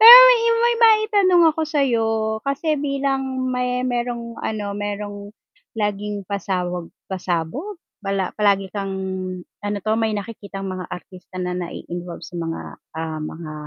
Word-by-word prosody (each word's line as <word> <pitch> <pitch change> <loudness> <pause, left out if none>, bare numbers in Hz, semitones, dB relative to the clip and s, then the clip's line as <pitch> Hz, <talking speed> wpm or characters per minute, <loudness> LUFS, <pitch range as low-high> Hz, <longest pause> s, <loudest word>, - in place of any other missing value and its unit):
Pero 465 +3 +14
may - - +7
maima 465 0 +3 0.2
maitanong 405 -5 +4
ako 320 - -4
sayo 270 -7 +2 0.3
kasi 275 +5 -1
bilang 270 -2 -1
may 250 0 0
me 255 - 0
merong 235 -1 -5
ano 210 -2 -3
merong 205 0 -4 0.5
laging 205 -1 -2
pasawag 180 -3 -2 0.2
pasabog 190 - -3 0.2
pala 195 -2 -1
palagi 200 -2 +3
kang 195 -2 -3 0.7
ano 205 0 -2
to 215 - +2
may 220 -1 +1
nakikitang 200 -2 -6
mga 185 -1 -6
artista 185 +1 -10
na 180 - -2
nai-involve 175 0 -6
sa 175 - -8
mga, 165 -1 -3 0.4
ah, 160 -1 -3
mga 155 +1 -6
205 Hz, 135 wpm, -22 LUFS, 185-265 Hz, 0.7 s, Pero